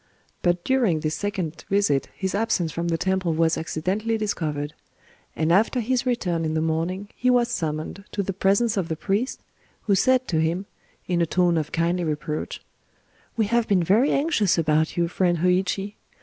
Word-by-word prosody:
But 175 Hz, 0 st, +1 dB
during 235 Hz, -12 st, +2 dB
this 155 Hz, 0 st, -1 dB
second 180 Hz, -3 st, -3 dB
visit 195 Hz, -9 st, +2 dB
his 190 Hz, 0 st, -3 dB
absence 195 Hz, -6 st, 0 dB
from 170 Hz, +2 st, -3 dB
the 165 Hz, -1 st, 0 dB
temple 185 Hz, -2 st, 0 dB
was 165 Hz, 0 st, +2 dB
accidentally 195 Hz, +8 st, -1 dB
discovered; 155 Hz, -8 st, -2 dB, 0.6 s
and 160 Hz, +1 st, +1 dB
after 220 Hz, +6 st, +3 dB
his 250 Hz, +2 st, 0 dB
return 180 Hz, -9 st, 0 dB
in 155 Hz, 0 st, -1 dB
the -, -, +2 dB
morning 165 Hz, +5 st, -2 dB
he 250 Hz, -, +1 dB
was 245 Hz, -1 st, +3 dB
summoned 160 Hz, -1 st, -3 dB
to 200 Hz, -, -1 dB
the 195 Hz, -, -3 dB
presence 200 Hz, +4 st, +2 dB
of 185 Hz, -4 st, 0 dB
the 160 Hz, -, -1 dB
priest, 205 Hz, -, -2 dB, 0.4 s
who 205 Hz, -, +2 dB
said 255 Hz, +6 st, +3 dB
to 160 Hz, -, +1 dB
him, 170 Hz, +5 st, -1 dB, 0.4 s
in 175 Hz, -1 st, 0 dB
a 170 Hz, -, +2 dB
tone 175 Hz, 0 st, +2 dB
of 155 Hz, -2 st, -1 dB
kindly 170 Hz, +2 st, 0 dB
reproach:— 150 Hz, -1 st, -3 dB, 0.8 s
"We 220 Hz, -, +3 dB
have 235 Hz, +2 st, +1 dB
been 190 Hz, -4 st, +3 dB
very 215 Hz, -, +3 dB
anxious 275 Hz, -, +2 dB
about 155 Hz, 0 st, +1 dB
you, 170 Hz, -1 st, +2 dB
friend 175 Hz, 0 st, +1 dB
Hōïchi. 185 Hz, +3 st, 0 dB
180 Hz, 180 wpm, -24 LUFS, 160-205 Hz, 0.8 s, after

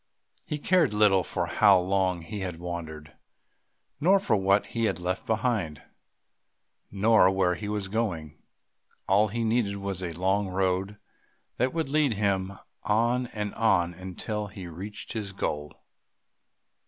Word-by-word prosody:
He 150 Hz, -, -2 dB
cared 155 Hz, -, +2 dB
little 100 Hz, -3 st, +4 dB
for 85 Hz, 0 st, -2 dB
how 100 Hz, +2 st, +5 dB
long 95 Hz, -1 st, 0 dB
he 105 Hz, +5 st, -6 dB
had 90 Hz, -3 st, -4 dB
wandered, 80 Hz, -3 st, -7 dB, 0.9 s
nor 190 Hz, +6 st, +5 dB
for 120 Hz, -, +1 dB
what 100 Hz, +1 st, +3 dB
he 115 Hz, -1 st, -2 dB
had 100 Hz, -, 0 dB
left 90 Hz, +1 st, -3 dB
behind, 110 Hz, -, -1 dB, 1.1 s
nor 105 Hz, -1 st, +4 dB
where 95 Hz, -2 st, +2 dB
he 100 Hz, +4 st, -5 dB
was 105 Hz, -2 st, -2 dB
going; 90 Hz, -8 st, -3 dB, 0.7 s
all 100 Hz, +3 st, +4 dB
he 115 Hz, +3 st, -2 dB
needed 110 Hz, -3 st, +1 dB
was 100 Hz, -2 st, -4 dB
a 90 Hz, -2 st, -3 dB
long 95 Hz, +4 st, 0 dB
road 95 Hz, +2 st, -1 dB, 0.6 s
that 130 Hz, +2 st, +1 dB
would 160 Hz, -4 st, -2 dB
lead 145 Hz, -3 st, +2 dB
him 100 Hz, -2 st, 0 dB, 0.3 s
on 120 Hz, +4 st, +1 dB
and 105 Hz, -3 st, -4 dB
on 90 Hz, -6 st, +2 dB
until 95 Hz, +4 st, -5 dB
he 95 Hz, -1 st, -9 dB
reached 95 Hz, +5 st, -8 dB
his 105 Hz, -3 st, -4 dB
goal. 75 Hz, -6 st, -4 dB
100 Hz, 140 wpm, -27 LUFS, 90-110 Hz, 1.1 s, how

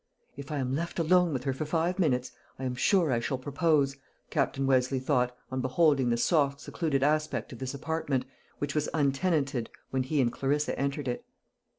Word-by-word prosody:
"If 140 Hz, +2 st, -8 dB
I 150 Hz, -, -1 dB
am 130 Hz, -1 st, -1 dB
left 170 Hz, +3 st, -3 dB
alone 175 Hz, +1 st, +4 dB
with 130 Hz, -3 st, -2 dB
her 135 Hz, -1 st, 0 dB
for 145 Hz, +4 st, -3 dB
five 170 Hz, +4 st, 0 dB
minutes, 130 Hz, -7 st, +1 dB, 0.3 s
I 130 Hz, -, -7 dB
am 130 Hz, -1 st, -1 dB
sure 165 Hz, +5 st, +3 dB
I 120 Hz, -, +2 dB
shall 130 Hz, +3 st, -2 dB
propose," 145 Hz, 0 st, +1 dB, 0.3 s
Captain 135 Hz, 0 st, 0 dB
Westleigh 130 Hz, 0 st, +2 dB
thought, 125 Hz, -2 st, 0 dB
on 130 Hz, 0 st, -1 dB
beholding 135 Hz, -1 st, +3 dB
the 120 Hz, -, +2 dB
soft 140 Hz, 0 st, +2 dB
secluded 150 Hz, -3 st, -1 dB
aspect 155 Hz, -1 st, 0 dB
of 120 Hz, -, -10 dB
this 130 Hz, +1 st, -4 dB
apartment, 140 Hz, -3 st, -1 dB, 0.3 s
which 145 Hz, -1 st, -3 dB
was 150 Hz, -1 st, 0 dB
untenanted 140 Hz, -3 st, +1 dB, 0.2 s
when 130 Hz, -, +1 dB
he 140 Hz, +3 st, -1 dB
and 120 Hz, -3 st, +3 dB
Clarissa 145 Hz, +2 st, 0 dB
entered 140 Hz, 0 st, -1 dB
it. 120 Hz, -, -2 dB
140 Hz, 190 wpm, -29 LUFS, 130-155 Hz, 0.3 s, alone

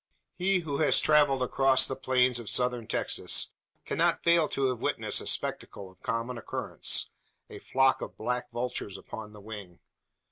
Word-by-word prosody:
He 185 Hz, 0 st, +1 dB
who 145 Hz, -4 st, -4 dB
has 155 Hz, -, +5 dB
travelled 145 Hz, -4 st, +3 dB
across 135 Hz, +1 st, +4 dB
the 135 Hz, -, -3 dB
plains 125 Hz, -2 st, +2 dB
of 115 Hz, -, -7 dB
Southern 125 Hz, -2 st, +1 dB
Texas -, -, +1 dB, 0.3 s
cannot -, -, 0 dB
fail 170 Hz, -2 st, +3 dB
to 135 Hz, -1 st, 0 dB
have 125 Hz, -2 st, -3 dB
witnessed -, -, 0 dB
a -, -, -8 dB
spectacle 95 Hz, -2 st, -2 dB
of 90 Hz, -, -27 dB
common 115 Hz, +2 st, -3 dB
occurrence -, -, -1 dB, 0.4 s
a -, -, -9 dB
flock 135 Hz, 0 st, +2 dB
of -, -, -7 dB
black 125 Hz, 0 st, -3 dB
vultures 120 Hz, -5 st, -4 dB
upon 105 Hz, +1 st, -9 dB
the 105 Hz, -, -13 dB
wing. 100 Hz, -5 st, -9 dB
125 Hz, 165 wpm, -28 LUFS, 115-135 Hz, 0.4 s, has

